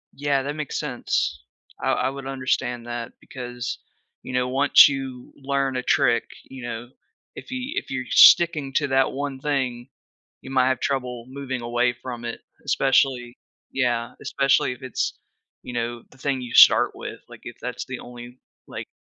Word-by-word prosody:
Yeah, 140 -1 0
that 145 +2 -4
makes 150 -2 -3
sense. - - -2 0.4
I - - +1
I - - +1
would 135 0 -7
understand 130 -2 -2
that 120 0 -5
because, 125 -1 -6 0.5
you 130 - -7
know, 125 0 +1
once 135 +3 +7
you 135 -3 -5
learn 135 -1 -1
a 125 - -2
trick, 120 -1 +2 0.2
you 130 -2 -9
know, 120 0 -6 0.5
if - - -10
you 255 +2 -4
if - - -4
you're 130 -1 -3
sticking 155 -6 +6
to 145 +1 +1
that 135 -1 +2
one 140 -1 -4
thing, 130 -3 -2 0.5
you 130 - -9
might 130 -1 +3
have 130 - 0
trouble 125 -3 -2
moving 130 -2 -5
away 120 +1 +1
from 120 0 -8
it, 115 - -5 0.2
especially 135 -3 +2 0.3
Yeah, 120 -3 -1
especially 135 -2 +2
if 125 - -11
it's, 130 -3 -3 0.4
you - - -8
know, 120 0 -3
the 130 - -20
thing 135 -1 -1
you 125 -1 -7
start - - +7
with, - - -8
like, - - -13
if - - -8
that's - - -5
the - - -6
only, 120 +1 -11 0.3
like, - - -7
130 Hz, 170 wpm, -24 LUFS, 120-135 Hz, 0.5 s, once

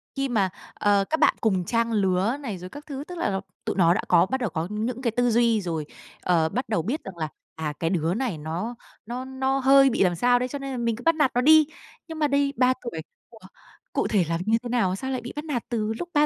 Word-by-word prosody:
Khi 275 -1 -1
mà, 205 -6 +2 0.2
ờ, 200 -1 +2
các 315 - 0
bạn - - +4
cùng 190 -5 +1
trang 230 +3 0
lứa 200 +3 +1
này 220 -9 -5
rồi 180 +1 -9
các 290 +6 -11
thứ, 280 -2 -6
tức 360 - -7
là, 195 - -1 0.2
tụi - - -1
nó 170 -3 +5
đã - - 0
có 175 -1 +5
bắt 265 +7 -2
đầu 235 - 0
có 160 0 -3
những 225 +4 -3
cái 240 -3 0
tư 245 +2 +1
duy 230 -1 +3
rồi, 165 -4 -3 0.4
ờ, 165 -3 +2
bắt 250 +7 -3
đầu 215 -7 +1
biết 245 - -3
rằng 190 -3 -9
là, 155 -2 -3 0.3
à, 155 -2 -3
cái 165 - 0
đứa 165 -2 0
này 230 -5 -2
nó 165 +10 -4 0.3
nó 245 +3 -5
nó 265 +1 -1
hơi 270 +1 +6
bị 235 - +2
làm 180 -2 +2
sao 245 +7 +3
đấy, 250 - -1
cho 285 +3 -5
nên 275 0 -5
là 260 - -4
mình 235 -2 0
cứ 240 - -11
bắt 330 0 +3
nạt 295 -4 +2
nó 245 - +3
đi. 310 +2 +6 0.4
Nhưng 320 -1 -7
mà 300 - +3
đây 280 0 +1
3 255 +1 +4
tuổi, 235 -10 -5 0.3
ủa, 225 - -16 0.5
cụ - - +1
thể 195 -5 +2
làm 165 0 -1
như 220 +1 +3
thế 245 - -5
nào, 225 -7 +1
sao 265 +7 -4
lại 255 -2 -2
bị 240 - -8
bắt 295 +1 -5
nạt 270 -7 -2
từ 220 -2 -1
lúc 350 - -5
3 295 0 +5
235 Hz, 270 wpm, -25 LUFS, 185-265 Hz, 0.5 s, hơi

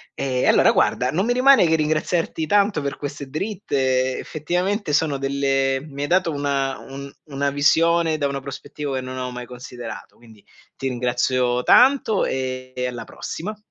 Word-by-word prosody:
Ehm, 130 -2 -1
allora, - - +5
guarda, 125 - +1
non 185 +6 0
mi 245 - +2
rimane 260 -3 +6
che 160 - +3
ringraziarti 155 +1 0
tanto 200 -3 +2
per 140 0 -3
queste 145 0 -6
dritte, 135 -8 -1
effettivamente 180 +3 -2
sono 150 -2 +2
delle 135 -1 0
mi 140 -1 -6
hai - - -1
dato 175 +1 +2
una 140 -2 -1
un 140 +1 -9
una 140 -2 -1
visione 160 +3 +3
da 145 - +1
una 140 0 -3
prospettiva 140 +1 -6
che 130 - -2
non 130 0 -7
avevo 125 -1 -4
mai 125 0 -7
considerato, 125 -1 -9
quindi 110 -3 -18 0.3
ti 135 - -4
ringrazio 125 0 0
tanto 255 - +5
e 130 -1 -3
e 125 0 -2
alla 120 -2 -5
prossima. 210 +6 -6
140 Hz, 165 wpm, -22 LUFS, 130-165 Hz, 0.3 s, rimane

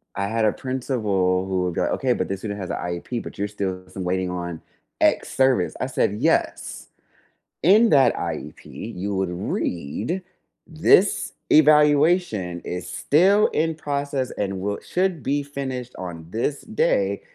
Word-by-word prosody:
I 100 0 -1
had 110 +1 0
a 105 - +4
principal 105 -8 0
who 95 -1 0
would 90 -1 -1
go, - - 0
"Okay, - - +1
but - - -2
this 95 0 -4
student 100 -2 -4
has 95 - -5
a - - -2
IEP 90 +7 -4
but - - -10
you're 100 - 0
still 95 -3 -4
waiting 95 -1 -1
on 85 -2 -5 0.4
X - - +2
service." 130 -1 +3
I 130 - 0
said, 105 -5 0
"Yes, - - 0 0.7
in 215 +7 +6
that 135 -2 +5
IEP, - - -5 0.3
you 100 +3 -3
would 95 -1 0
read 90 - -3 0.4
this 165 +4 +3 0.2
evaluation 150 - +4
is 90 +1 -5
still 190 - +3
in 160 +1 0
process 140 -3 -2
and 95 -2 -2
will 100 +1 -2
should 180 -4 -1
be 145 +4 0
finished 130 -3 -5
on 85 -3 -7
this 120 +7 -2
day - - 0
115 Hz, 150 wpm, -23 LUFS, 95-150 Hz, 0.7 s, in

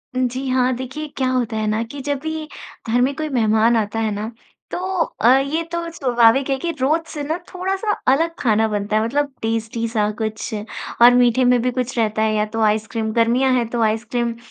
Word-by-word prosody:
जी 255 +1 -1
हाँ, 255 0 +2
देखिए 260 +5 -6
क्या 260 -1 +1
होता 245 -3 -1
है 215 - -1
ना 215 +1 0
कि 255 +5 -9
जब 285 0 -2
भी 315 +1 -4 0.4
घर 245 +2 +2
में 265 +3 +2
कोई 310 +1 -3
मेहमान 225 -2 +3
आता 220 0 -1
है 220 -1 0
ना, 210 +2 -4 0.4
तो - - -2 0.4
अ, 240 +3 +6
ये 300 +5 -1
तो 340 0 -3
स्वाभाविक 250 -2 +3
है 270 - +1
कि 335 +4 -2
रोज़ 305 +5 +2
से 295 -2 -4
ना 315 +4 -2 0.2
थोड़ा-सा 385 +3 -1 0.2
अलग 330 +4 +1
खाना 220 -2 +2
बनता 210 0 -2
है 215 - +2
मतलब 280 +4 -1
टेस्टी 225 +1 -2
सा 215 -2 0
कुछ, 220 0 -3 0.5
और 240 +1 +9
मीठे 245 0 +4
में 245 -1 +4
भी 250 +1 0
कुछ 250 0 -3
रहता 215 -1 0
है 220 0 +2
या 210 0 +1
तो 225 - 0
आइसक्रीम 220 +1 0
गर्मियाँ 240 +3 +3
हैं 245 -2 +1
तो 235 0 -2
आइसक्रीम। 230 +2 0
245 Hz, 205 wpm, -20 LUFS, 220-270 Hz, 0.5 s, और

